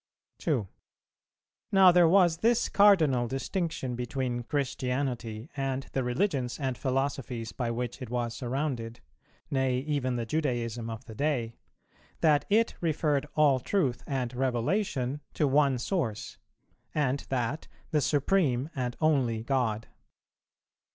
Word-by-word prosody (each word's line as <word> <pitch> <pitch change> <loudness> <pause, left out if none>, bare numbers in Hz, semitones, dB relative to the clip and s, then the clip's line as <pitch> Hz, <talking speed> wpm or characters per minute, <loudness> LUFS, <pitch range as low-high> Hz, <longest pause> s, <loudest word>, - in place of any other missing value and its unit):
2. 130 - 0 1.0
Now 190 -2 +7
there 175 -1 +6
was 175 -3 +5
this 230 +5 +2
cardinal 160 -12 +5
distinction 135 -1 -3
between 125 0 -2
Christianity 125 -2 -2
and 135 -1 -2
the 135 - 0
religions 125 -1 -1
and 135 -3 -1
philosophies 130 -3 -2
by 120 -3 -3
which 120 +3 -4
it 125 - -6
was 120 -1 -2
surrounded, 120 -2 -3 0.5
nay 130 -2 +1
even 130 -2 -1
the 120 -1 -2
Judaism 120 -5 -2
of 115 +3 -7
the 110 - -9
day, 125 -3 -1 0.7
that 150 -3 +4
it 225 +3 +3
referred 150 -3 0
all 145 -4 +4
truth 130 -2 0
and 130 -3 -2
revelation 130 - -1
to 150 - +2
one 140 -1 +3
source, 120 - -3 0.6
and 140 -2 +1
that 130 +3 -2 0.2
the 150 -2 +2
Supreme 145 -1 +1
and 125 -2 -3
Only 130 -8 +2
God. 115 -4 0
130 Hz, 125 wpm, -29 LUFS, 120-150 Hz, 1.0 s, Now